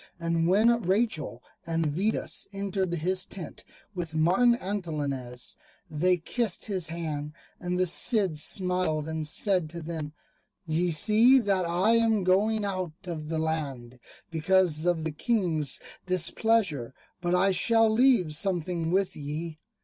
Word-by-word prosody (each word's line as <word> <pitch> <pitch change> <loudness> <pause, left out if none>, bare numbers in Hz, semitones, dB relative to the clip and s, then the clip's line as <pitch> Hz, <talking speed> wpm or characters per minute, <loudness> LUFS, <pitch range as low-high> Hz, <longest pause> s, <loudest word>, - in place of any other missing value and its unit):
And 165 0 0
when 230 +6 +4
Rachel 185 - -1 0.2
and 165 -1 -1
Vidas 185 +9 -1
entered 195 -2 -2
his 180 +3 0
tent 185 -4 -9 0.3
with 170 -4 -5
Martin 190 +10 +4
Antolinez, 150 - -4 0.3
they 180 +4 +2
kissed 215 +4 -2
his 185 -6 -1
hand; 155 -3 -4 0.3
and 180 0 -2
the 185 - +2
Cid 190 - +2
smiled 180 -3 -1
and 160 -1 -3
said 180 0 +1
to 170 +2 -7
them, 155 -2 -5 0.5
"Ye 165 +2 0
see 220 +10 +5
that 200 -6 +1
I 175 +6 +2
am 225 -3 +2
going 205 +4 +2
out 185 -5 -3
of 155 -4 -5
the 160 - -2
land, 140 -6 -3 0.3
because 165 0 +1
of 170 -3 +1
the 160 - -2
King's 160 - -1 0.3
displeasure; 185 - 0 0.3
but 175 0 +1
I 190 +2 +3
shall 225 +5 +4
leave 220 - +3
something 175 -2 -1
with 190 +2 0
ye." 155 +2 -6
175 Hz, 135 wpm, -27 LUFS, 155-195 Hz, 0.5 s, see